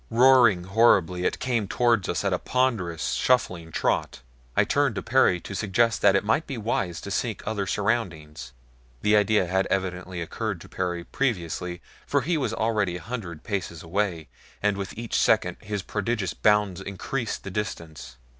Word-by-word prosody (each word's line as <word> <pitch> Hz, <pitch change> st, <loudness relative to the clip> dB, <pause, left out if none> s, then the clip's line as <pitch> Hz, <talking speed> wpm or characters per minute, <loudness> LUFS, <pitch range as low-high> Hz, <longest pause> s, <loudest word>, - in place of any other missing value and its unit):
Roaring 120 Hz, -6 st, +5 dB
horribly 95 Hz, -3 st, +3 dB
it -, -, 0 dB
came 120 Hz, -5 st, -1 dB
toward 115 Hz, -2 st, +2 dB
us 85 Hz, -, -1 dB
at 100 Hz, -2 st, +1 dB
a 90 Hz, -, 0 dB
ponderous, 110 Hz, -, 0 dB
shuffling 90 Hz, -10 st, +1 dB
trot. -, -, -1 dB, 0.4 s
I -, -, +6 dB
turned 140 Hz, -5 st, +1 dB
to -, -, -3 dB
Perry 115 Hz, -7 st, +3 dB
to -, -, -8 dB
suggest 110 Hz, +4 st, +1 dB
that 100 Hz, -1 st, +5 dB
it 100 Hz, -, +2 dB
might 110 Hz, +9 st, +1 dB
be 135 Hz, -, -4 dB
wise 95 Hz, -6 st, -2 dB
to 100 Hz, -, -7 dB
seek 110 Hz, 0 st, -2 dB
other 105 Hz, -2 st, -2 dB
surroundings 85 Hz, -, -2 dB, 0.5 s
the 105 Hz, 0 st, +4 dB
idea 105 Hz, -1 st, +3 dB
had 95 Hz, +2 st, 0 dB
evidently 90 Hz, -1 st, -2 dB
occurred 85 Hz, -, -3 dB
to -, -, -12 dB
Perry 90 Hz, -2 st, -3 dB
previously, 90 Hz, -, -2 dB, 0.2 s
for 140 Hz, -, +2 dB
he 165 Hz, +6 st, 0 dB
was 130 Hz, -8 st, -1 dB
already 110 Hz, -5 st, 0 dB
a -, -, -11 dB
hundred 100 Hz, -10 st, -6 dB
paces 90 Hz, -6 st, -4 dB
away, 85 Hz, -2 st, -1 dB, 0.3 s
and 105 Hz, 0 st, +1 dB
with 100 Hz, 0 st, -6 dB
each 115 Hz, 0 st, -4 dB
second 90 Hz, -5 st, +2 dB
his 105 Hz, -1 st, -4 dB
prodigious 105 Hz, -2 st, -2 dB
bounds 105 Hz, -3 st, +2 dB
increased 110 Hz, +5 st, -4 dB
the 95 Hz, -, -6 dB
distance. 85 Hz, -, -5 dB
100 Hz, 170 wpm, -25 LUFS, 90-115 Hz, 0.5 s, I